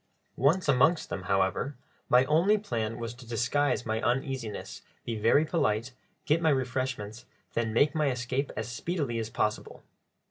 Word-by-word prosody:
Once 160 Hz, +7 st, +2 dB
amongst 140 Hz, +5 st, +3 dB
them, 95 Hz, -1 st, -5 dB
however, 95 Hz, +8 st, +1 dB, 0.3 s
my 125 Hz, +1 st, +5 dB
only 170 Hz, +9 st, +4 dB
plan 115 Hz, -, -3 dB
was 115 Hz, 0 st, -5 dB
to 125 Hz, +1 st, -13 dB
disguise 120 Hz, +4 st, 0 dB
my 110 Hz, 0 st, -1 dB
uneasiness, 125 Hz, -2 st, -2 dB, 0.2 s
be 115 Hz, -, -2 dB
very 115 Hz, +8 st, +3 dB
polite, 120 Hz, -7 st, 0 dB, 0.3 s
get 155 Hz, +2 st, +2 dB
my 160 Hz, -, +3 dB
refreshments, 130 Hz, -4 st, -2 dB, 0.3 s
then 115 Hz, -1 st, 0 dB
make 145 Hz, +6 st, +3 dB
my 150 Hz, -3 st, +1 dB
escape 130 Hz, +2 st, -2 dB
as 110 Hz, -, -2 dB
speedily 125 Hz, -1 st, -2 dB
as 110 Hz, -1 st, -3 dB
possible. 105 Hz, -1 st, -2 dB
125 Hz, 150 wpm, -29 LUFS, 115-145 Hz, 0.3 s, my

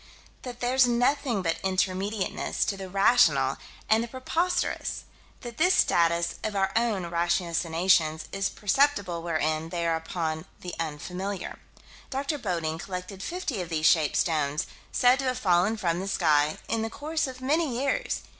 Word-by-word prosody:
That 245 Hz, -1 st, -8 dB
there's 250 Hz, +1 st, +4 dB
nothing 245 Hz, -2 st, +1 dB
but 165 Hz, -1 st, -1 dB
intermediateness 190 Hz, +2 st, -1 dB
to 200 Hz, -, -2 dB
the 190 Hz, -1 st, -7 dB
rational 200 Hz, +6 st, +4 dB, 0.3 s
and 220 Hz, +1 st, +3 dB
the -, -, -5 dB
preposterous: 320 Hz, +9 st, -1 dB, 0.4 s
that 240 Hz, -3 st, -8 dB
this 360 Hz, +3 st, +4 dB
status 170 Hz, 0 st, +2 dB
of 215 Hz, -1 st, -2 dB
our 195 Hz, -1 st, +1 dB
own 225 Hz, -5 st, +1 dB
ratiocinations 170 Hz, -1 st, +1 dB
is 195 Hz, 0 st, -1 dB
perceptible 205 Hz, -6 st, +1 dB
wherein 155 Hz, -1 st, -1 dB
they 170 Hz, -1 st, -2 dB
are 165 Hz, -1 st, +2 dB
upon 160 Hz, 0 st, -3 dB, 0.2 s
the 180 Hz, -, -6 dB
unfamiliar. 180 Hz, +5 st, -4 dB, 0.5 s
Dr. 280 Hz, +2 st, -2 dB
Bodding 165 Hz, -6 st, -2 dB
collected 185 Hz, +1 st, -6 dB
50 300 Hz, -, -3 dB
of 175 Hz, -, -6 dB
these 155 Hz, -2 st, -1 dB
shaped 155 Hz, -3 st, +4 dB
stones, 150 Hz, -3 st, 0 dB, 0.3 s
said 250 Hz, +2 st, +4 dB
to 270 Hz, -, -2 dB
have 255 Hz, -1 st, 0 dB
fallen 195 Hz, -1 st, +2 dB
from 175 Hz, -5 st, 0 dB
the 190 Hz, -, -4 dB
sky, 155 Hz, -5 st, +2 dB
in 225 Hz, -1 st, -1 dB
the 225 Hz, -, -2 dB
course 310 Hz, +5 st, -2 dB
of 255 Hz, -1 st, -8 dB
many 280 Hz, -1 st, 0 dB
years. -, -, -1 dB
195 Hz, 155 wpm, -27 LUFS, 170-245 Hz, 0.5 s, there's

